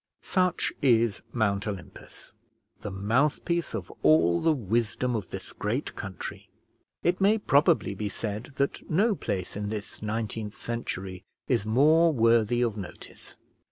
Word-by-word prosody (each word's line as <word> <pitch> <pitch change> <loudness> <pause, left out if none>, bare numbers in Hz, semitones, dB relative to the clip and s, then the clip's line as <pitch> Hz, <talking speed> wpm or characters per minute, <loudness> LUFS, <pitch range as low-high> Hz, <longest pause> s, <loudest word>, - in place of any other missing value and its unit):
Such 180 -2 +1
is 115 -5 +3
Mount 100 -3 0
Olympus, 100 0 -8 0.5
the 105 - -5
mouthpiece 135 - 0
of 95 -6 -6
all 85 +2 +4
the 165 - +4
wisdom 120 0 0
of 105 -3 -3
this 95 -1 -7
great 115 +7 -2
country. 95 -1 -7 0.5
It 180 +2 +1
may 205 +3 +5
probably 150 - +3
be 105 +1 -3
said 105 +2 -4
that 140 0 -2
no 205 +8 +3
place 95 - -4
in 105 0 -3
this 105 -1 -5
19th 110 -1 -3
century 95 -6 -5 0.2
is 105 - +1
more 155 +8 +5
worthy 115 -2 +3
of 115 -3 -1
notice. 95 -5 -9
110 Hz, 135 wpm, -27 LUFS, 100-140 Hz, 0.5 s, may